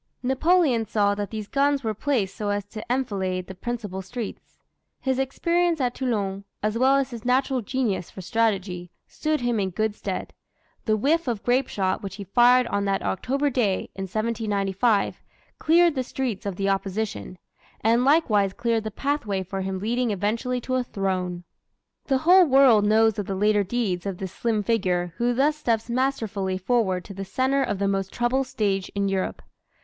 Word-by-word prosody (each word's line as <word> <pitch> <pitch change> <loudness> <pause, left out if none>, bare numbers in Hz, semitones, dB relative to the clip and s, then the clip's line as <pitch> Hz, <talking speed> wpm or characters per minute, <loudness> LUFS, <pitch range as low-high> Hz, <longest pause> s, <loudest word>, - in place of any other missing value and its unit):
Napoleon 265 -1 +3
saw 205 -1 +2
that 205 -1 -4
these 215 -1 -5
guns 280 +1 +1
were 220 -1 -1
placed 215 -4 -1
so 210 -1 -3
as 205 -1 -1
to 215 0 -7
enfilade 190 -8 -1
the 190 - -8
principal 205 -2 -5
streets. 225 +3 -7 0.4
His 265 -1 -1
experience 335 +5 +1
at 250 -2 0
Toulon, 200 -7 -2 0.2
as 215 +1 0
well 260 +3 +4
as 275 -1 0
his 230 -3 -7
natural 260 +1 +1
genius 220 -5 -2
for 190 - -9
strategy, 190 -3 -1 0.2
stood 310 -2 -2
him 240 -2 0
in 190 -1 0
good 215 +4 -1
stead. - - -5 0.5
The 215 -1 +2
"whiff 305 +8 +1
of 230 -4 -2
grape 250 +2 +2
shot" 190 -2 -1
which 195 -1 -6
he 200 - -7
fired 245 +6 +5
on 200 -3 -1
that 195 -1 0
October 275 +8 0
day, 215 -7 0
in 195 - -5
1795, 210 0 0 0.4
cleared 335 +1 +4
the 265 - -1
streets 240 -5 -3
of 195 - -3
the 195 +1 -1
opposition 195 0 -2 0.4
and 230 +3 +3
likewise 220 - +3
cleared 230 -1 -1
the - - -1
pathway 215 -5 -2
for 195 +1 -4
him 190 0 -3
leading 235 +5 0
eventually 220 +5 -1
to 255 - -4
a 255 - 0
throne. 185 -5 -2 0.6
The 270 - +2
whole 365 +1 +8
world 260 -6 +6
knows 220 0 +3
of 205 - -3
the 195 - -2
later 210 +1 +3
deeds 195 -4 -2
of 190 -2 -3
this 190 -1 -5
slim 220 -1 -1
figure 180 -5 0
who 240 0 +1
thus 295 +4 +2
steps 230 -5 -1
masterfully 225 -7 -1
forward 190 -3 0
to 200 - -9
the 195 0 -5
center 260 +7 0
of 235 - -1
the 200 0 0
most 195 -1 -1
troubled 255 +2 0
stage 200 -7 -1
in 200 0 +1
Europe. 195 -1 -2
220 Hz, 180 wpm, -25 LUFS, 195-255 Hz, 0.6 s, whole